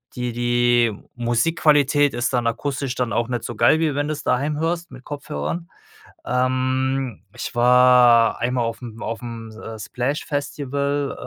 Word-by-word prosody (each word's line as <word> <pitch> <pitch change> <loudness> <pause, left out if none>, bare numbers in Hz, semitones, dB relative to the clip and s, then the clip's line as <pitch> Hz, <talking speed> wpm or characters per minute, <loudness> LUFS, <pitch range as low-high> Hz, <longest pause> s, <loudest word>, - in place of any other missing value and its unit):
die 125 -1 -2
die 120 -1 +2 0.2
Musikqualität 145 +3 +2
ist 120 +2 -1
dann 120 -2 0
akustisch 135 +2 -2
dann 125 -2 -1
auch 120 - 0
nicht 120 -1 -3
so 120 - -5
geil, 120 +7 +4
wie 150 -4 +1
wenn 145 +1 -1
du's 155 -1 -4
daheim 145 +4 0
hörst 170 +2 -2
mit 130 0 -12
Kopfhörern. 85 - -5 0.6
Ähm, 130 0 -1
ich 120 0 -6
war 125 -1 +5
einmal 120 0 0
aufm 115 0 -6
aufm, 115 0 -6
äh, 110 0 -9
Splash 125 +7 -3
Festival, 140 -1 -2
125 Hz, 145 wpm, -22 LUFS, 120-140 Hz, 0.6 s, war